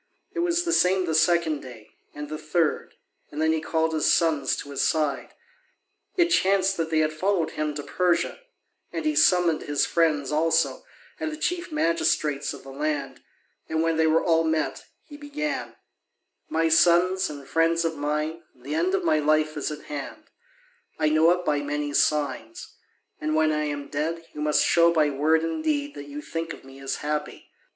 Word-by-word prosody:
It - - -4
was 345 0 +1
the 340 -1 0
same 185 - +3
the 160 - -2
second 165 -2 +2
day, 115 -4 -12 0.2
and 150 0 -6
the 155 +1 -6
third, 155 +1 -1 0.3
and 150 - -7
then 160 0 +3
he 160 - -1
called 160 0 0
his 155 - +2
sons 155 -6 +2
to 145 - -8
his 140 - -2
side 150 -4 0 0.8
it 345 -1 +4
chanced 195 - +3
they 160 -1 -1
had 155 0 +2
followed 180 0 0
him 150 -1 -3
to 145 - -5
Persia 180 +2 0 0.5
and 325 - -4
he 310 - +2
summoned 180 - +4
his 145 -1 0
friends 150 -5 +1
also 160 -3 +1 0.4
and 315 -1 -2
the 310 - -6
chief 350 +2 -2
magistrates 155 - 0
of - - -9
the 135 - -10
land, 145 0 -3 0.5
and 160 0 0
when 165 -1 +1
they 160 0 +3
were 160 +1 +3
all 165 -1 +3
met, 160 -1 -1 0.2
he 290 - -12
began: 295 +1 -4 0.7
"My 165 +1 +1
sons, 175 +3 +4
and 140 -2 -9
friends 165 +3 +2
of 165 -1 -1
mine, 150 +3 -2
the 130 +4 -7
end 175 +4 +1
of - - -1
my 155 -2 +2
life 155 +1 +1
is 150 - -2
at 150 0 -7
hand: 145 -2 -7 0.7
I 155 - +2
know 155 +2 +4
it 180 0 +1
by 145 -3 +1
many 145 0 -3
signs. 140 -7 -1 0.5
And 155 0 -1
when 155 0 +3
I 150 0 0
am 145 -1 -4
dead, 165 +4 -3
you 150 - -6
must 150 0 +2
show 170 0 +4
by 155 -3 +2
word 155 +4 +2
and 165 - -3
deed 290 -2 -1
that 145 - -8
you 145 +1 -7
think 165 0 -4
of - - -13
me 135 0 -14
as 135 0 -3
happy. 150 0 -4
160 Hz, 190 wpm, -25 LUFS, 150-170 Hz, 0.8 s, it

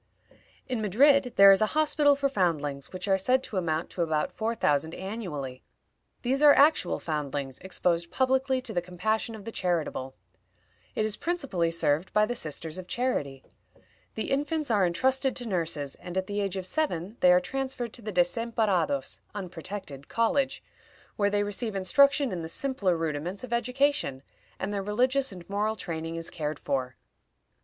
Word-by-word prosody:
In 250 -4 -2
Madrid 255 +5 +4
there 195 0 +9
is 195 - +5
a 215 - +4
hospital 295 -2 +4
for 280 0 +1
foundlings, 150 - -1
which 185 +1 -5
are 190 -1 +3
said 255 +6 +2
to 205 - -5
amount 165 -2 -1
to 180 - -3
about 155 -2 0
four 225 +1 -2
thousand 150 -4 +1
annually. 165 - -5 0.6
These 265 +3 +1
are 295 -1 +8
actual 285 - +4
foundlings, 140 -4 -3
exposed 170 -2 0
publicly 260 0 +1
to 255 - -5
the 175 - 0
compassion 215 +6 -2
of 210 -2 -11
the 230 - -5
charitable. 165 -9 -2 0.8
It 215 - +1
is 215 -1 0
principally 275 - -1
served 165 0 0
by 210 0 +4
the 245 - -2
Sisters 160 -4 -4
of 180 - -9
Charity. 145 - -2 0.7
The 220 - -3
infants 295 0 0
are 200 -4 +4
intrusted 265 +9 +1
to 245 - -4
nurses, 165 -7 -2
and 180 +1 -7
at 190 - 0
the 205 +1 -2
age 195 -1 -2
of 185 - -4
seven 200 - -2
they 180 - +6
are 180 - +6
transferred 260 +2 -4
to 240 - -6
the 215 -1 -5
Desamparados 180 - 0
(unprotected) 180 -6 -7
college, 265 +4 0 0.5
where 205 -1 +2
they 205 0 +1
receive 205 +1 -3
instruction 280 +8 +4
in 180 -2 -3
the 160 - -5
simpler 200 -6 0
rudiments 165 +5 -3
of 245 -2 -5
education, 250 - 0 0.3
and 205 +2 -3
their 200 - -1
religious 255 +6 +1
and 180 -3 -10
moral 210 +2 0
training 165 -4 -5
is 165 0 -5
cared 150 -3 -3
for. 130 -3 -2
195 Hz, 170 wpm, -28 LUFS, 165-250 Hz, 0.8 s, there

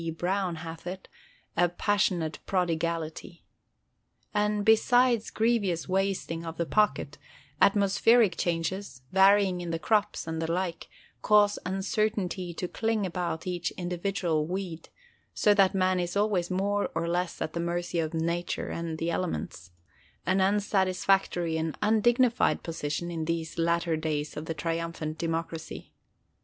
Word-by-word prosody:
Browne 185 0 -1
hath 165 +1 -8
it) 185 +1 -6 0.5
a 175 0 +3
"passionate 175 -3 0
prodigality." 170 -2 -2 0.9
And, 210 -1 +1
besides 235 +1 +4
grievous 215 -7 0
wasting 190 -3 -1
of 165 -1 -6
the 170 - 0
pocket, 210 +4 +1 0.4
atmospheric 200 +1 +4
changes, 170 -4 -2
varyings 195 -1 +5
in 175 - -5
the 165 - -1
crops, 210 +5 0
and 160 0 -3
the 165 0 -1
like, 175 -1 -3 0.3
cause 205 -1 +4
uncertainty 195 -1 -1
to 180 +2 -4
cling 220 +1 -1
about 175 -2 -3
each 175 -2 -2
individual 175 -3 -1
weed, 180 -2 -5 0.5
so 210 - +4
that 195 -2 +4
man 185 -1 +2
is 175 +2 -2
always 200 -4 +1
more 200 +2 0
or 170 - -1
less 175 +1 -1
at 155 - -3
the 170 - -3
mercy 175 0 -2
of 160 0 -2
Nature 170 +2 -2
and 165 -1 -4
the 165 +1 -1
elements—an 90 - -4
unsatisfactory 190 -3 +1
and 160 -1 -2
undignified 240 +3 +3
position 165 +1 -3
in 165 -2 -3
these 165 0 -3
latter 170 0 +1
days 155 -1 -2
of 150 - -5
the 165 - -4
Triumphant 165 0 -3
Democracy. 165 -1 -4
175 Hz, 130 wpm, -28 LUFS, 165-200 Hz, 0.9 s, varyings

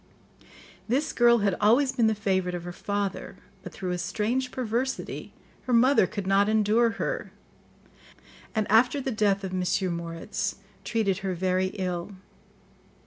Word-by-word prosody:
This 265 +7 0
girl 240 -1 +5
had 195 -3 +2
always 245 +6 +4
been 240 -4 +2
the 220 - +1
favourite 190 -3 0
of 175 - -5
her 175 - -6
father, 200 +1 -3 0.3
but - - -9
through 185 -2 -4
a 180 - -2
strange 240 +7 -1
perversity, 250 +1 -3 0.4
her 250 - 0
mother 245 -3 +5
could 200 -3 -5
not 195 +2 +3
endure 220 +2 +3
her, - - -3 1.2
and 215 -1 +1
after 245 +5 +4
the 265 -1 -2
death 205 -3 +1
of 190 -1 -4
M. 185 0 0
Moritz, 170 +4 -4 0.3
treated 210 -4 0
her 190 -2 -3
very 185 +1 +1
ill. 180 0 -3
205 Hz, 145 wpm, -27 LUFS, 185-235 Hz, 1.2 s, girl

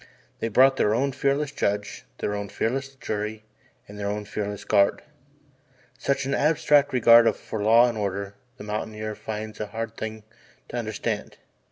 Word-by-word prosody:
They - - -1
brought 130 +4 +5
their 105 -3 +2
own 135 +3 +1
fearless 140 +2 0
judge, 105 -6 -2
their 105 - -2
own 100 -1 -4
fearless 135 +4 -2
jury 110 -3 -4 0.4
and 105 0 -10
their 100 - -2
own 105 0 -3
fearless 105 0 -4
guard. 100 -2 +3 1.0
Such 140 -1 0
an 135 - -1
abstract 150 -1 +3
regard 115 -2 +7
for 110 - -6
law 115 +3 +6
and 115 -3 -3
order 100 0 -3 0.2
the - - -9
mountaineer 110 0 -4
finds 110 0 -6
a 105 - -3
hard 115 +1 -5
thing 110 -1 -6 0.5
to - - -7
understand. 110 -3 -3
110 Hz, 160 wpm, -25 LUFS, 105-125 Hz, 1.0 s, regard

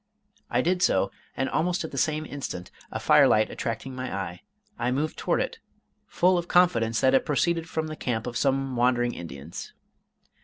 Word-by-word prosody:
I 125 - +2
did 180 +5 +1
so, - - +3 0.3
and 135 - 0
almost 175 +7 0
at - - -6
the - - -6
same 155 -1 0
instant 135 -12 -6 0.2
a - - -3
fire - - +6
light 110 0 +3
attracting 115 +3 -4
my 130 0 -4
eye, 95 -3 -4 0.4
I 120 - +1
moved 145 +5 -1
toward - - 0
it, - - -3 0.5
full 180 0 +3
of 170 - -5
confidence 140 -13 +3
that 130 0 +4
it 135 - +4
proceeded 165 +2 0
from 160 0 -2
the 155 0 -5
camp 115 -6 -2
of 120 -1 -5
some 135 -1 +1
wandering 120 0 +2
Indians. 80 -1 -8
130 Hz, 185 wpm, -26 LUFS, 115-160 Hz, 0.5 s, fire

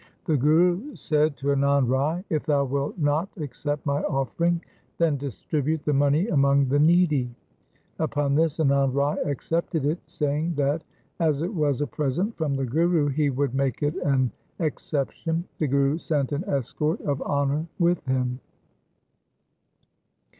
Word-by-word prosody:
The 160 -5 +2
Guru 175 - +2
said 150 -1 +1
to 140 - -2
Anand 140 -1 +3
Rai, 145 +8 0
' - - -45
If 150 - -3
thou 140 -2 +2
wilt 140 +4 -2
not 155 +4 +1
accept 145 0 -4
my 140 0 0
offering, 165 +6 0 0.4
then 165 -3 +2
distribute 145 +3 -2
the 150 - +1
money 145 +6 +3
among 140 -2 +3
the 145 +2 +2
needy.' 155 -5 +3 0.7
Upon 145 -3 0
this 160 +1 +2
Anand 140 -3 +2
Rai 140 +1 +1
accepted 160 +1 -1
it, 155 +4 0
saying 150 +3 -1
that 145 +3 0 0.4
as 155 -3 +1
it 180 +6 -3
was 150 -6 0
a - - +2
present 155 - -2
from 150 -4 -1
the 135 0 -1
Guru 160 +3 +2
he 145 +1 +1
would 135 -1 -1
make 135 -1 -1
it 145 +3 0
an 135 -7 +1 0.3
exception. 160 +1 -2 0.2
The 155 - +1
Guru 140 +3 +2
sent 145 -5 -1
an 145 +6 -2
escort 150 - -1
of 140 -2 -2
honour 145 +3 0
with 175 -2 +2
him. 125 -1 0
145 Hz, 155 wpm, -25 LUFS, 140-160 Hz, 0.7 s, Anand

